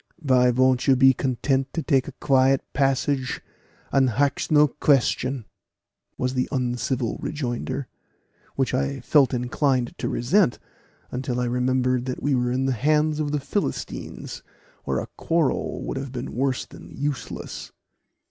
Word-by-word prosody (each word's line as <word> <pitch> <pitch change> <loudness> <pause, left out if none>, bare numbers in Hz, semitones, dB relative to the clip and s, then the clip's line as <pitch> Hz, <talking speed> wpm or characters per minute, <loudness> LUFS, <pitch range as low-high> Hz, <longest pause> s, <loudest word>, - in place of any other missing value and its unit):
"Vy 130 -5 +4
vont 130 +1 +2
you 135 - +6
be 130 +1 +6
content 135 +1 0
to 165 - -1
take 135 -4 +2
a - - -5
quiet 135 -2 +3
passage 135 -1 0 0.5
and 135 -2 +4
hax 140 +4 0
no 150 -1 +6
question?" 135 -3 +1 0.7
was 125 0 -1
the 125 -1 -1
uncivil 125 -2 -1
rejoinder, 130 -1 -3 0.7
which 135 -2 0
I 135 +1 -1
felt 140 +1 +4
inclined 125 0 0
to - - -1
resent, 155 - +2 0.5
until 125 -1 -2
I 125 - 0
remembered 125 0 +1
that 130 -1 -4
we 145 +1 +2
were 125 -1 +1
in 130 +1 0
the 135 - +1
hands 150 +4 +2
of 150 -1 -1
the 150 - 0
Philistines, 195 +9 -4 0.4
where - - 0
a - - -2
quarrel 165 -4 0
would - - -4
have 135 -1 -5
been 125 0 -5
worse 130 +1 0
than - - -13
useless. 145 -2 -4
130 Hz, 150 wpm, -24 LUFS, 125-140 Hz, 0.7 s, you